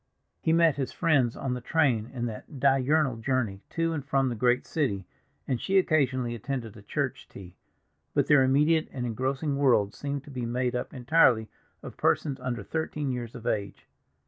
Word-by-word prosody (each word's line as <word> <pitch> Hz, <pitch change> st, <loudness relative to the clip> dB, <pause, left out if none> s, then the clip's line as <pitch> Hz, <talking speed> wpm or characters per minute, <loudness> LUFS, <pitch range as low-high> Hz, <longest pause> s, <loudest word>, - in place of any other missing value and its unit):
He 160 Hz, -, +1 dB
met 165 Hz, -3 st, +4 dB
his 135 Hz, -2 st, -2 dB
friends 135 Hz, -8 st, +2 dB
on 130 Hz, -2 st, -2 dB
the 125 Hz, -, -4 dB
train 125 Hz, -6 st, +1 dB
in 120 Hz, -2 st, -3 dB
that 120 Hz, +5 st, -7 dB
diurnal 135 Hz, 0 st, +3 dB
journey 115 Hz, -4 st, -1 dB
to 165 Hz, 0 st, -1 dB
and 145 Hz, -3 st, -3 dB
from 135 Hz, -1 st, +1 dB
the 120 Hz, -, -3 dB
great 125 Hz, +2 st, +2 dB
city, 105 Hz, -, -1 dB, 0.4 s
and 125 Hz, -3 st, -1 dB
she 195 Hz, -, +1 dB
occasionally 130 Hz, -9 st, +2 dB
attended 120 Hz, -1 st, -5 dB
a 105 Hz, -, -12 dB
church 100 Hz, -, -3 dB
tea; 90 Hz, -2 st, -12 dB, 0.6 s
but -, -, +3 dB
their 145 Hz, -2 st, +5 dB
immediate 150 Hz, +5 st, +3 dB
and 125 Hz, -2 st, -4 dB
engrossing 135 Hz, +5 st, -1 dB
world 120 Hz, -8 st, +3 dB
seemed 140 Hz, -1 st, -4 dB
to 145 Hz, -, -12 dB
be 125 Hz, -2 st, -4 dB
made 125 Hz, +1 st, -1 dB
up 125 Hz, -, -3 dB
entirely 125 Hz, -4 st, +3 dB, 0.3 s
of -, -, -9 dB
persons 140 Hz, -3 st, +1 dB
under 125 Hz, -4 st, -3 dB
thirteen 150 Hz, 0 st, -3 dB
years 120 Hz, -2 st, -5 dB
of 120 Hz, -2 st, -9 dB
age. 100 Hz, -2 st, -2 dB
130 Hz, 180 wpm, -28 LUFS, 120-145 Hz, 0.6 s, their